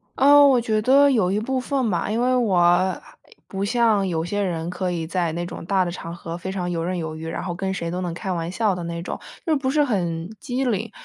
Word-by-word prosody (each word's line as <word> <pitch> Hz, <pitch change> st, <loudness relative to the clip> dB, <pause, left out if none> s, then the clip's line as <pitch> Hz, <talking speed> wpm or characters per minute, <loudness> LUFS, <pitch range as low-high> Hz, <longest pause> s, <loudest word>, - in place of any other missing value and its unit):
呃， 285 Hz, +2 st, +7 dB
我 260 Hz, -3 st, +5 dB
觉 220 Hz, -2 st, 0 dB
得 280 Hz, +4 st, +5 dB
有 210 Hz, -8 st, +2 dB
一 205 Hz, -, +1 dB
部 260 Hz, +4 st, -1 dB
分 255 Hz, -3 st, -1 dB
吧， 175 Hz, -, -1 dB
因 225 Hz, +2 st, 0 dB
为 255 Hz, +1 st, +2 dB
我 185 Hz, -5 st, +3 dB, 0.5 s
不 195 Hz, 0 st, -4 dB
像 220 Hz, -3 st, +2 dB
有 165 Hz, -2 st, -1 dB
些 205 Hz, +3 st, -2 dB
人 170 Hz, -3 st, -2 dB
可 180 Hz, 0 st, -2 dB
以 165 Hz, -2 st, -3 dB
在 170 Hz, -1 st, -1 dB
那 175 Hz, +1 st, -3 dB
种 -, -, -7 dB
大 190 Hz, -1 st, +2 dB
的 175 Hz, -, -3 dB
场 170 Hz, 0 st, -7 dB
合 170 Hz, -1 st, -6 dB
非 190 Hz, +2 st, -5 dB
常 180 Hz, -2 st, -3 dB
游 165 Hz, -1 st, -2 dB
刃 180 Hz, +2 st, -2 dB
有 160 Hz, -2 st, -4 dB
余， 160 Hz, +1 st, -7 dB
然 165 Hz, -, -4 dB
后 175 Hz, -, -3 dB
跟 190 Hz, +2 st, -3 dB
谁 170 Hz, -3 st, -3 dB
都 180 Hz, +1 st, -3 dB
能 175 Hz, -, -2 dB
开 190 Hz, +1 st, -4 dB
玩 170 Hz, 0 st, -3 dB
笑 210 Hz, -1 st, +1 dB
的 180 Hz, -, -5 dB
那 170 Hz, 0 st, -4 dB
种， -, -, -5 dB, 0.3 s
又 320 Hz, -, +2 dB
不 270 Hz, -2 st, -1 dB
是 295 Hz, +2 st, +3 dB
很 175 Hz, -, -2 dB
机 265 Hz, -2 st, -2 dB
灵， 225 Hz, -2 st, -1 dB
190 Hz, 270 characters per minute, -23 LUFS, 175-235 Hz, 0.5 s, 呃